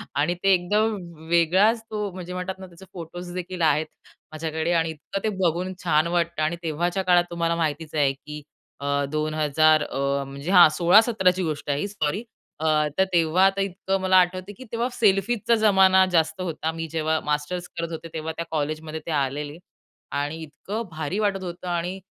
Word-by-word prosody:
आणि 150 +5 +1
ते 195 -1 +5
एकदम 210 +5 +1 0.3
वेगळाच 185 +7 +3
तो, 210 -2 -3
म्हणजे 180 -1 -7
म्हणतात 185 +1 -4
ना, 190 - -9
त्याचे 175 +2 -15
फोटोज 175 +1 -8
देखील 180 -1 -5
आहेत 155 0 +3 0.5
माझ्याकडे 160 +1 -2
आणि 165 -1 +1
इतकं 160 +5 -6
ते 220 - +1
बघून 180 +1 0
छान 160 -2 +3
वाटतं 170 -2 0
आणि 165 +3 0
तेव्हाच्या 175 +4 -1
काळात 175 -1 +4
तुम्हाला 170 0 0
माहितीच 160 -1 -2
आहे 145 -3 +3
की 150 +2 -10 0.4
अ, 140 0 0
2000 155 0 +2
अ, 140 0 -1
म्हणजे 140 +5 -6
हां 180 -4 +8
16-17ची 190 0 +4
गोष्ट 155 -3 -4
आहे 145 0 +1
ही, - - -1
सॉरी. 200 +1 -2 0.4
अ, 160 - -3 0.3
तर 190 - +5
तेव्हा 170 +2 +4
आता 195 0 +2
इतकं 195 0 -2
मला 185 0 +4
आठवतं 185 +2 +1
की - - -10
तेव्हा 235 +1 0
सेल्फीजचा 215 +2 +2
ज़माना 190 -3 +5
जास्त 165 +1 +1
होता, 160 -2 -2
मी 165 0 -5
जेव्हा 160 -1 0
मास्टर्स 150 +4 -2
करत 170 0 -3
होते, 160 +1 -6
तेव्हा 160 0 -4
त्या 170 - -3
कॉलेजमध्ये 155 +1 -3
ते 165 - -4
आलेले 145 +1 -2 0.6
आणि 145 +3 -3
इतकं 195 +9 -6
भारी 160 +5 -3
वाटत 200 -3 0
होतं 175 0 -7
आणि 175 +2 -2
170 Hz, 175 wpm, -24 LUFS, 155-190 Hz, 0.6 s, हां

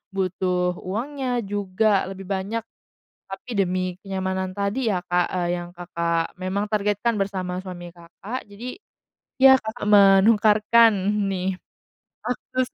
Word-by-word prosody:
butuh 180 -1 0
uangnya 250 +5 -3
juga 200 +1 +1
lebih 195 0 -8
banyak. 200 +4 -2 0.7
Tapi 195 +5 -9
demi 185 -1 0
kenyamanan 190 -1 -3
tadi, 205 +5 -1
ya, 185 - 0
Kak, 175 0 +2
eee, 180 -1 -1
yang 175 0 -8
Kakak 170 -1 -2
memang 195 +3 -1
targetkan 210 +2 0
bersama 185 -2 -2
suami 175 -2 -8
Kakak, 185 +8 -8
jadi, 230 +5 -8 0.7
ya, 265 0 +9
Kakak 220 +1 -6
menukarkan, 210 +3 +6 0.4
nih, 185 0 -2 0.7
akses 255 +1 -2
195 Hz, 120 wpm, -23 LUFS, 185-220 Hz, 0.7 s, ya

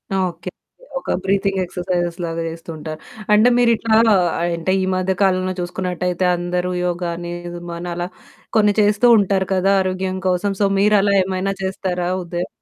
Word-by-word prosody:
Okay. 180 -1 -2 0.5
ఒక - - -3
breathing 195 0 +1
ఎక్సర్సైజ్‌లాగా 175 -2 -3
జేస్తుంటారు. 160 -1 -7 0.3
అంటే 215 +4 +6
మీరిట్లా 230 -2 +3 0.5
అంటే 170 +1 -1
ఈ - - 0
మధ్య 185 +1 0
కాలంలో 185 -1 +2
చూసుకున్నట్టయితే 180 0 -2
అందరూ 180 +1 -2
యోగ 175 0 -2
అని 175 0 -6 0.4
మనలా 175 +1 -4 0.5
కొన్ని 210 -1 +4
చేస్తూ 210 +3 +3
ఉంటారు 195 -2 +1
కదా! 190 +1 +2
ఆరోగ్యం 185 0 -2
కోసం. 185 +2 +1
సో 200 - +4
మీరు 210 +1 +4
అలా 200 0 +2
ఏమైనా 190 +1 -2
చేస్తారా? 185 -2 -2 0.2
ఉదయ 175 +1 -4
185 Hz, 135 wpm, -20 LUFS, 175-195 Hz, 0.5 s, అంటే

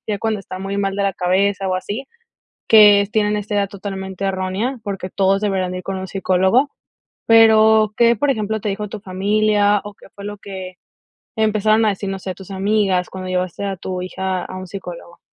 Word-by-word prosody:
ya 205 -2 -1
cuando 220 -2 -1
está 185 -1 -8
muy 195 +1 -4
mal 195 -1 -1
de 200 - 0
la 195 - +1
cabeza 190 +2 +1
o 185 - 0
así, 210 +8 -4 0.6
que 205 -2 +7
tienen 210 -1 +1
esta 210 0 -4
idea 200 -1 +2
totalmente 190 -1 -6
errónea, 195 +7 -2
porque 195 -3 -4
todos 195 +1 +2
deberían 190 -3 -1
de 185 - -4
ir - - -7
con 195 - -3
un 190 - -5
psicólogo, 190 +8 +2 0.6
pero, 220 -1 +6
¿qué, 235 0 +5
por 285 +7 +1
ejemplo, 220 -2 -2
te 210 - -2
dijo 210 +1 -4
tu 210 - -7
familia 205 +2 +2
o 205 - -8
qué - - -17
fue 200 - -9
lo 205 0 -6
que 190 -2 -8 0.6
empezaron 215 0 +2
a - - +4
decir, 200 0 -5
no 195 0 -4
sé, 185 0 -5
tus 190 0 -13
amigas 195 -2 +1
cuando 185 -1 -7
llevaste 185 +1 -2
a 195 -1 -2
tu 185 0 -5
hija 185 0 -3
a - - -8
un 185 0 -7
psicólogo? 175 -2 -9
200 Hz, 205 wpm, -19 LUFS, 190-210 Hz, 0.6 s, que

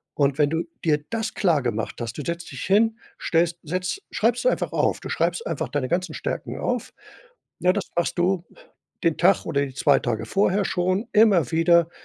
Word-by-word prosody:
Und 140 -1 +2
wenn 145 -1 +4
du 165 +1 0 0.2
dir 150 -2 +2
das 225 -1 -2
klargemacht 125 - 0
hast, 115 -1 -5
du - - -3
setzt 170 +2 -5
dich 135 - -6
hin, 220 +4 +3 0.2
stellst 170 +1 +1
setzt 180 - -3
schreibst 230 +2 +1
du - - +6
einfach - - -2
auf. - - +1
Du - - -7
schreibst 475 - -1
einfach - - -3
deine 140 -3 -1
ganzen 175 -2 -1
Stärken - - -4
auf. - - -2 0.7
Ja, 180 - +4
das 200 -3 -2
machst 175 +1 0
du 180 0 +1 0.6
den 165 -2 +2
Tag 185 +2 +3
oder 140 0 0
die 135 - -9
2 140 +1 +4
Tage 115 -2 -2
vorher 195 - +1
schon 185 +5 0
immer 205 - +4
wieder 165 0 +4
170 Hz, 190 wpm, -24 LUFS, 145-195 Hz, 0.7 s, du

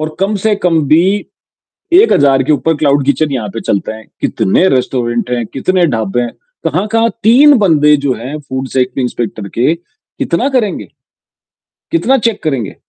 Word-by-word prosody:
और 155 0 -4
कम 195 +2 0
से 220 +1 +1
कम 175 -5 +1
भी 165 +5 +4 0.9
1,000 140 - +4
के 150 - 0
ऊपर 160 +2 +1
क्लाउड 140 -2 +1
किचन 145 +2 +1
यहाँ 115 -6 -3
पे 115 - -5
चलते 100 - -2
हैं। 110 0 -10 0.2
कितने 135 - +1
रेस्टोरेंट 125 -2 -1
हैं, 120 -2 -1
कितने 180 - 0
ढाबे 115 -5 -1
हैं। 120 - -3 0.3
कहाँ-कहाँ 225 +4 0
3 270 +7 +6
बंदे 150 -6 +4
जो 135 - +2
हैं 130 +7 -6
फूड 130 0 -3
सेफ्टी 130 0 0
इंस्पेक्टर 115 -4 -4
के, 125 +9 0
कितना 175 +6 -4
करेंगे? 245 -7 -1 1.0
कितना 270 -5 +2
चेक 230 -3 -1
करेंगे? 135 -9 -2
150 Hz, 160 wpm, -13 LUFS, 125-195 Hz, 1.0 s, 3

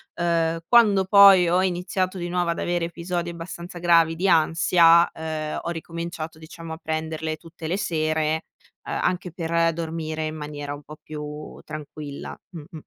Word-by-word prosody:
uhm, 165 -1 +1
quando 210 -5 +5
poi 195 -2 +8
ho 180 +2 +3
iniziato 185 +1 -1
di 175 -1 -4
nuovo 175 -1 0
ad 170 - -1
avere 175 -1 -1
episodi 175 +1 -4
abbastanza 170 +1 -8
gravi 165 -1 +4
di 185 +4 0
ansia, 170 +1 +5
uhm, 155 -1 -4
ho - - -4
ricominciato 165 -1 -6
diciamo 160 +1 -9
a 160 - -7
prenderle 160 0 -3
tutte 165 -1 -9
le 180 +4 -1
sere, 155 -3 0 0.4
ehm, - - -2
anche 180 -1 -1
per 165 -1 +1
dormire 160 -1 -4
in 155 0 -4
maniera 145 -1 -6
un 145 - -9
po' 150 +2 -12
più 150 0 -8
tranquilla, 150 -1 -8 0.2
mh-mh. 160 +1 -9
165 Hz, 160 wpm, -24 LUFS, 155-175 Hz, 0.4 s, poi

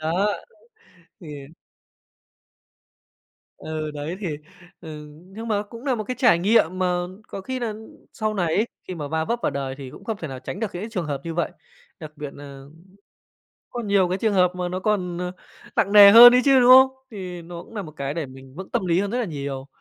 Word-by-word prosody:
đó! 175 +6 0 0.9
Thì 170 - -11 2.3
ừ, 155 -1 -5
đấy, 150 +4 -5
thì, 170 -7 -3 0.4
ừ, 150 -2 -9 0.2
nhưng 220 +5 -8
mà 205 -2 0
cũng 230 +4 -12
nà 270 -3 +1
một 215 -2 -4
cái 255 - -4
trải 240 -9 +5
nghiệm 185 -2 +2
mà 180 -1 0 0.2
có 195 - -6
khi 260 +6 -4
nà 235 -3 -3 0.4
sau 215 -1 -2
này 180 -4 0
ấy 215 - +2 0.2
khi 185 - -4
mà 150 -4 -5
va 160 +1 -1
vấp 235 +7 -1
vào - - +1
đời 135 -1 -4
thì 135 -2 -8
cũng - - -13
không 225 -2 -3
thể 165 -6 -7
nào 130 - -7
tránh 175 +9 -7
được 225 - 0
những 175 - -5
cái 220 - -6
trường 180 -7 -3
hợp 145 -2 -3
như 165 -1 -5
vậy, 170 0 -1 0.5
đặc 155 -2 -9
biệt 145 -1 -7
nà 140 -1 -11 1.1
có 240 - -5
nhiều 200 -3 +2
cái 185 - -1
trường 220 0 0
hợp 180 -2 +3
mà 180 -1 -3
nó 180 +1 -3
còn, 185 -4 -1
ờ, 180 0 -3 0.4
nặng 200 - +1
nề 200 -1 +10
hơn 240 +3 +11
ấy 250 - +5
chứ, 270 -2 +6
đúng 245 0 +5
không? 260 +1 +9 0.2
Thì 180 -4 -7
nó 170 0 -9
cũng - - -17
nà 210 - -4
một 160 -5 -9
cái 140 -2 -4
để 165 -1 -3
mình 130 0 -14
vững 190 +2 -8
tâm 235 -6 -1
lý 175 0 +2
hơn 200 +1 -2
rất 245 - -1
là 245 - -1
nhiều. 140 -5 -5
180 Hz, 225 wpm, -23 LUFS, 155-215 Hz, 2.3 s, hơn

